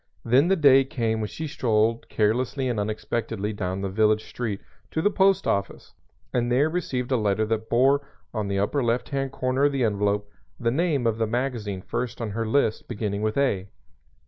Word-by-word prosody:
Then 130 +7 +4
the 195 - +4
day 140 -5 +6
came 115 -4 -1
when 105 - -1
she 160 +10 -6
strolled 115 -5 0
carelessly 125 +5 0
and 120 -4 -1
unexpectantly 110 0 -2
down 95 -1 -3
the 100 - -1
village 110 +1 +2
street 110 -5 -4 0.3
to - - -2
the 205 +6 +2
post 195 -1 +3
office 100 0 -2 0.4
and 120 -1 0
there 140 +5 +3
received 135 -8 -2
a 130 - +3
letter 105 0 +1
that 110 0 -2
bore 135 +4 +4 0.3
on 110 -3 -2
the 100 0 -1
upper 105 +8 0
left 120 +1 0
hand 135 -1 -2
corner 130 +1 0
of 145 - +2
the 135 -2 0
envelope 105 -1 0 0.3
the 115 0 +1
name 150 -3 +1
of 115 -1 +1
the 115 - +1
magazine 110 -5 -2
first 125 -2 -3
on 115 -3 -3
her 115 +2 -2
list 110 -2 +1
beginning 105 -3 -3
with 110 +2 -1
"A." 105 -9 +1
115 Hz, 195 wpm, -25 LUFS, 105-135 Hz, 0.4 s, day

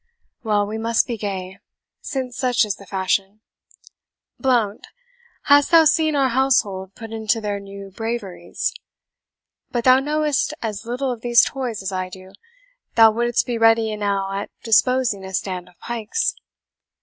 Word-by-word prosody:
Well, 210 -2 +1
we 215 +2 -5
must 230 0 +2
be 235 - -3
gay, 190 -3 -5 0.4
since 255 -2 -4
such 250 -3 +2
is 205 -2 -3
the 200 - -14
fashion. 195 +2 -1 1.0
Blount, 235 -6 0 0.6
hast 285 0 +5
thou 330 -1 +7
seen 315 0 +3
our 270 -2 +3
household 210 -7 +1
put 225 0 -9
into 225 0 0
their 205 -2 -3
new 200 0 -10
braveries? 225 -2 -4 1.0
But 240 -1 -2
thou 255 +1 +6
knowest 300 0 0
as 215 -1 -5
little 255 +2 -2
of 240 -2 -6
these 240 0 +5
toys 245 -7 -4
as 190 - -3
I 185 -1 -3
do; 185 +1 -12 0.6
thou 225 -1 +7
wouldst 240 +2 0
be 240 -2 -3
ready 225 -1 +4
enow 200 -2 -1
at 200 +1 -4
disposing 230 -2 +2
a 190 0 -5
stand 180 -1 -4
of 180 - -25
pikes." 235 - -2
225 Hz, 150 wpm, -21 LUFS, 200-250 Hz, 1.0 s, thou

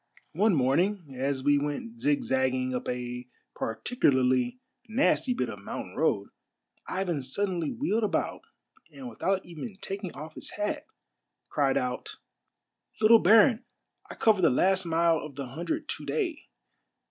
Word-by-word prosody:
" - - -28
One 200 +3 +3
morning 155 +4 +1
as 135 +1 -1
we 145 0 +4
went 225 - -4
zigzagging 130 - +1
up 125 - -3
a 125 0 -4 0.3
particularly 130 - +1 0.3
nasty 250 +1 +2
bit - - -1
of - - -7
mountain - - -7
road, - - +1 0.6
Ivan 180 -6 -1
suddenly 170 +4 -2
wheeled 235 -3 0
about 210 - -1 0.5
and 265 -2 -9
without 195 -5 -1
even 175 +4 -8
taking 195 -2 -5
off 155 +2 -8
his - - -8
hat, 210 0 -2 0.6
cried 140 -2 +2
out, 125 0 -3 0.3
— - - -56
" - - -35
Little 225 +1 +7
baron, 225 +5 +6 0.5
I - - -8
cover 215 -4 +3
the 165 - +6
last 190 +8 +2
mile 165 -1 +3
of 150 -2 -8
the 135 -2 -5
hundred 295 - -3
to - - -4
day. 350 -9 -2
175 Hz, 145 wpm, -28 LUFS, 135-225 Hz, 0.6 s, Little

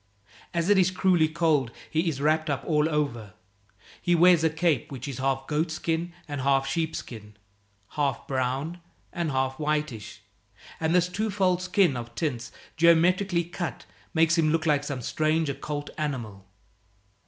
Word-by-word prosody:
As 170 0 -1
it 205 -1 +5
is 185 -1 +4
cruelly 180 -3 +3
cold, 155 -5 +1 0.2
he 165 +2 0
is 140 -4 -4
wrapped 155 +2 +1
up 135 -4 -1
all 150 -1 +2
over. 120 - -2 0.7
He 175 -1 +2
wears 175 -1 +6
a 160 - +4
cape 160 -6 0
which 130 0 -6
is 135 -3 -5
half 135 0 0
goatskin 160 +2 -1 0.2
and 145 -2 -4
half 135 0 +2
sheepskin, 120 -10 -4 0.5
half 140 -5 -1
brown 135 +6 -2 0.3
and 170 -3 -1
half 130 0 -1
whitish, 150 -9 -3 0.6
and 160 +2 +1
this 180 0 +4
twofold 190 -2 0
skin 185 -5 +2
of 120 -1 -7
tints 130 -7 -3 0.3
geometrically 170 +2 +4
cut 175 0 -5 0.3
makes 165 0 +3
him 155 -1 +3
like 145 -2 +2
some 140 -4 -4
strange 155 +2 0
occult 145 +1 -4
animal. 115 -10 -4
155 Hz, 145 wpm, -26 LUFS, 135-170 Hz, 0.7 s, wears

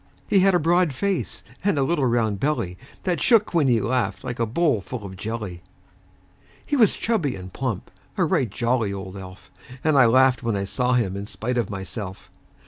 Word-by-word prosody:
He 200 - +4
had 190 0 +4
a - - +4
broad 170 -1 +2
face, 195 +6 -2 0.2
and 200 -5 +2
a 140 - +3
little 145 -2 +1
round 110 -4 +1
belly 120 -10 -1 0.3
That 180 -2 -1
shook 225 -6 +4
when 160 -5 +3
he 120 -3 +4
laughed, 120 +4 -1
like 125 -2 -5
a 115 - +1
bowl 140 - +1
full 110 +1 -7
of 95 -1 -8
jelly. 105 -3 -5 1.0
He 290 - 0
was 225 -7 +4
chubby 190 - 0
and 95 -1 -9
plump 125 -6 -3 0.3
a - - +3
right 125 - +1
jolly 115 0 0
old 95 -1 -6
elf; 95 -1 -11 0.3
And 155 -3 +4
I 125 - +7
laughed 130 +2 +4
when 115 -3 -1
I 100 - -1
saw 125 +5 0
him 110 -6 +1
in 100 +1 -5
spite 120 +3 -2
of 115 - -1
myself. 95 0 -7
125 Hz, 200 wpm, -24 LUFS, 100-150 Hz, 1.0 s, I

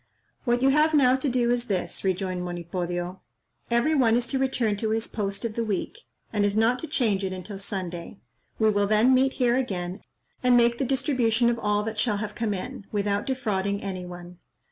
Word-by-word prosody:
"What 240 0 +1
you 270 - +6
have 305 +3 +4
now 255 -3 +5
to 270 +1 -1
do 240 -1 +2
is 245 0 0
this," 180 -4 -2
rejoined 185 -1 -1
Monipodio: 175 +1 -4 0.5
"Every 235 +7 +2
one 240 -6 +4
is 240 0 +1
to 270 - 0
return 250 -5 +1
to 220 +1 -1
his 225 +1 0
post 200 +1 -3
of 225 - -2
the 230 - -1
week, 220 - -3 0.3
and 205 -2 +2
is 205 +1 +1
not 230 +3 +3
to 320 - -6
change 210 -9 +1
it 190 - -1
until 185 +2 -6
Sunday. 185 -2 -5 0.4
We 220 -1 +3
will 205 -1 +1
then 215 +5 +4
meet 265 +1 +3
here 245 -2 +2
again, 190 -7 -2 0.4
and 250 -1 +5
make 235 0 +3
the 270 - +1
distribution 245 -3 +2
of 235 - -3
all 210 -1 +1
that 220 0 -4
shall 210 -2 +1
have 210 0 -4
come 215 -2 -1
in, 195 +1 -7
without 205 +3 -1
defrauding 200 -6 -1
any 190 -2 -4
one. 175 0 -10
215 Hz, 205 wpm, -26 LUFS, 195-245 Hz, 0.5 s, you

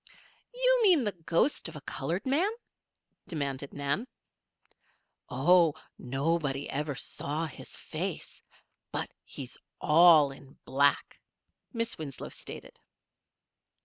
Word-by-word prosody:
"You - - +3
mean 360 - +5
the 210 - 0
ghost 170 - +1
of 165 - -12
a 150 - -8
colored 165 +7 -3
man?" 300 +10 +3 0.8
demanded 140 -4 -3
Nan. 145 - -1 1.2
"Oh! 165 +4 +4 0.2
nobody 140 +1 -1
ever 145 0 -2
saw 150 +4 -3
his 155 - -9
face. - - -5 0.5
But - - -3
he's - - -8 0.2
all 155 -2 +7
in 135 0 -14
black," 140 +1 +2 0.5
Miss 230 -5 -3
Winslow 140 -4 -6
stated. - - -10
155 Hz, 105 wpm, -30 LUFS, 140-190 Hz, 1.2 s, all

